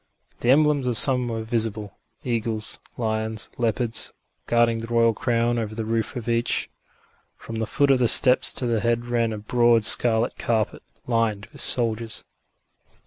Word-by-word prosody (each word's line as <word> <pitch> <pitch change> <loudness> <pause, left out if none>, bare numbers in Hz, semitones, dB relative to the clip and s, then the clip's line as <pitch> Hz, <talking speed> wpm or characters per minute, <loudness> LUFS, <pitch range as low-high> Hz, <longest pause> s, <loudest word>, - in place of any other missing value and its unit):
The 120 - -1
emblems 145 -1 +3
of 120 -3 0
some 125 -1 +4
were 115 -1 -4
visible 110 -3 -2 0.3
eagles, 115 -3 -3 0.2
lions, 110 -1 -3
leopards 115 0 -1 0.3
guarding 120 -1 +2
the 115 - -7
royal 115 -1 +2
crown 120 +1 0
above 110 -1 -5
the 110 -1 -4
roof 115 0 -2
of 120 -2 -6
each. 115 0 -1 0.7
From 115 - -8
the 110 - -2
foot 140 +2 +1
of 130 - +3
the 120 - +3
steps 125 +3 +5
to 125 - -1
the 115 -2 0
head 120 +1 -1
ran 120 -2 -1
a 110 - -5
broad 115 +1 +2
scarlet 115 +1 +3
carpet, 110 -3 -1 0.2
lined 115 -4 -1
with - - -7
soldiers. 115 -2 0
115 Hz, 160 wpm, -23 LUFS, 110-120 Hz, 0.7 s, steps